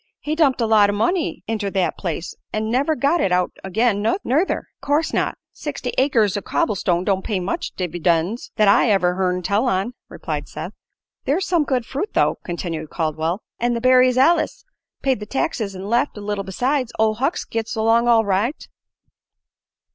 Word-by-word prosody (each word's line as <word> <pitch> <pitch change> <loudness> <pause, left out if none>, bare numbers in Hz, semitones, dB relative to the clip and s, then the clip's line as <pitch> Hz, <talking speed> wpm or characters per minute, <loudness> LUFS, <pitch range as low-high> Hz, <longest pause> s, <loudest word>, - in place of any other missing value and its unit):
He 300 - -3
dumped 300 -5 +3
a - - +3
lot 215 -2 +5
o' - - 0
money 315 - 0
inter 215 -2 -2
that 190 -2 0
place, 170 -2 -4 0.2
an' 220 +1 -2
never 280 +6 +2
got 285 +6 +2
it 190 - +1
out 180 0 +2
agin', 205 +2 +1
nuther." 290 - 0 0.2
"'Course 300 +3 0
not. - - 0
Sixty 280 -4 -5
acres 235 -7 +2
o' 205 - -1
cobble 330 +5 0
stone 180 -2 0
don't 190 -1 0
pay 200 -4 -1
much 180 +2 -3
divvydends, 175 +4 -1
that 215 -2 +3
I 200 +4 +5
ever 180 -3 +3
hearn 180 -1 -1
tell 205 +7 +1
on," 195 +3 0 0.2
replied - - -5
Seth. - - -7 0.5
"There's 330 +8 +1
some 340 -5 +2
good 255 -4 0
fruit, 295 - -4
though," - - +2
continued 165 -3 -4
Caldwell, 160 +3 -2 0.2
"an' 240 0 +1
the - - -1
berries 255 0 +4
allus 335 - +2 0.4
paid 265 -4 +1
the 210 - -7
taxes 225 - -2
an' 185 +1 -7
left 235 +4 0
a - - -6
little 205 -1 -3
besides. 250 +6 -1
Ol' 220 0 +3
Hucks 270 +9 -1
gits 225 0 -3
along 225 +2 +3
all 230 -2 +5
right." 205 - -1
220 Hz, 180 wpm, -21 LUFS, 190-260 Hz, 0.5 s, lot